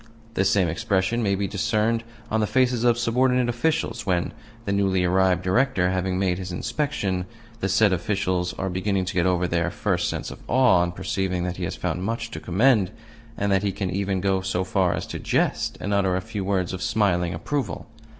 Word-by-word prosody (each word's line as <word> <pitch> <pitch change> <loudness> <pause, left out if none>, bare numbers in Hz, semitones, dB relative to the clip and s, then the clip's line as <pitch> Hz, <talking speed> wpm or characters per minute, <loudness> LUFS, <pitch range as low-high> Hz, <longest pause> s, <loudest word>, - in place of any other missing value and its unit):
The 95 - +1
same 95 -2 +3
expression 95 +7 0
may 100 -3 +1
be 100 +1 -1
discerned 115 +2 0 0.3
on 110 - +2
the 105 - +1
faces 125 -1 +2
of 120 -1 +4
subordinate 125 +1 +2
officials 120 -2 -1
when, 90 -3 0 0.3
the 100 - -1
newly 95 -2 +2
arrived 90 0 +2
Director 95 -2 +2
having 95 0 -1
made 95 -2 0
his 95 -1 -5
inspection, 105 -4 -2 0.3
the 95 - -1
said 105 -2 +4
officials 90 -1 -1
are 95 - -3
beginning 95 +1 -1
to 95 - -4
get 90 0 +2
over 90 -1 +1
their 85 0 0
first 90 -1 -1
sense - - -4
of - - -10
awe 125 -8 +4
on 85 0 +1
perceiving 90 0 -2
that 90 0 -3
he 90 - -2
has - - -4
found 90 - -2
much 115 +3 -3
to - - -5
commend, 105 +1 +3 0.5
and 100 0 0
that 95 -1 +3
he 100 -1 0
can 95 -1 -3
even 95 -1 -1
go 95 0 +1
so 95 -1 -1
far 95 -1 +1
as - - -4
to - - -6
jest - - 0
and 100 - -2
utter 95 -2 +2
a 95 - -1
few 105 0 -5
words 95 -2 0
of 90 - -5
smiling 90 -6 +1
approval. 135 - -3
95 Hz, 205 wpm, -24 LUFS, 90-110 Hz, 0.5 s, of